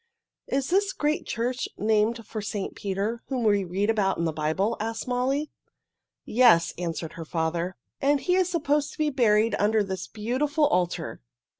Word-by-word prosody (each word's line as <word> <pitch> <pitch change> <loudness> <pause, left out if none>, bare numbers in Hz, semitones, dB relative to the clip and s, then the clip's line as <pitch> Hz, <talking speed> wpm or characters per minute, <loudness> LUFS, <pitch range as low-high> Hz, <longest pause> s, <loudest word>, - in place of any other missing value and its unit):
"Is 270 +3 -1
this 390 +1 +2
great 300 +1 -1
church 245 +2 -2
named 220 +2 +1
for 215 +1 -5
St. 205 -1 -4
Peter 205 +4 -3
whom 255 -3 -2
we 205 -2 +3
read 190 +3 -1
about 205 -4 +1
in 170 - 0
the 160 - -1
Bible?" 160 +9 0
asked 225 +2 -3
Molly. 265 +4 0 0.7
"Yes," 220 -8 +5
answered 165 -2 -4
her 165 - -7
father. 170 +3 -2 0.3
"And 285 +1 +3
he 360 - 0
is 370 -1 +3
supposed 295 -4 0
to - - -15
be 305 -1 +1
buried 230 -4 +3
under 210 +1 +3
this 190 -2 -5
beautiful 280 +8 0
altar. 180 - -1
220 Hz, 165 wpm, -26 LUFS, 190-270 Hz, 0.7 s, Yes